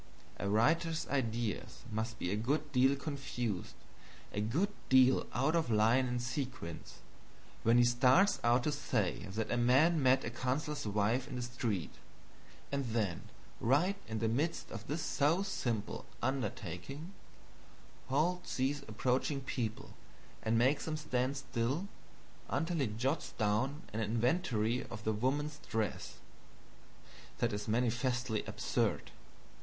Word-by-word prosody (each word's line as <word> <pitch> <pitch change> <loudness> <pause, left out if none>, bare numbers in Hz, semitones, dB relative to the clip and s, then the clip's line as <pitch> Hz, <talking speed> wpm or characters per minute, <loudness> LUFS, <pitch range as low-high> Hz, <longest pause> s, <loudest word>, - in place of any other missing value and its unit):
A 100 - -2
writer's 160 +9 +2
ideas 120 -5 -2
must 110 +2 -2
be 90 - -2
a - - +1
good 145 +7 -1
deal 135 +1 +4
confused, 135 - -4 0.6
a 105 - -1
good 160 - 0 0.2
deal 130 0 +5
out 135 +7 +1
of 165 -6 +1
line 115 +4 +4
and 125 0 -1
sequence, 125 - -5 0.6
when 115 +2 +4
he 120 - +7
starts 130 +12 +4
out 120 +1 +4
to 150 - +1
say 120 -9 -1
that 110 +3 -3
a 120 - +1
man 140 +7 +4
met 130 0 +4
a 115 - -3
counselor's 130 +3 -2
wife 105 +6 +1
in 135 - -6
the 125 - -2
street, 120 -7 -2 0.8
and 140 -1 -1
then 110 -7 -2 0.3
right 150 - +3
in 110 - -3
the 110 +1 +1
midst 145 +9 -1
of 110 0 -7
this 155 +2 -2
so 160 +6 +2
simple 120 - -3
undertaking 135 - -3 0.9
halts 165 +7 0
these 135 +2 0
approaching 130 +5 0
people 120 -4 -4 0.5
and 110 +1 +1
makes 130 +5 +3
them 155 -1 -2
stand 130 -2 -1
still 130 +7 -1 0.6
until 170 +1 0
he 135 -5 +2
jots 125 +8 -2
down 120 +8 0
an 110 - -1
inventory 115 - +1
of 110 -1 -8
the 110 - +1
woman's 145 +7 -1
dress. 110 -1 -2 1.2
That 120 -2 0
is 105 0 -4
manifestly 120 0 0
absurd. - - -1
125 Hz, 135 wpm, -34 LUFS, 110-145 Hz, 1.2 s, he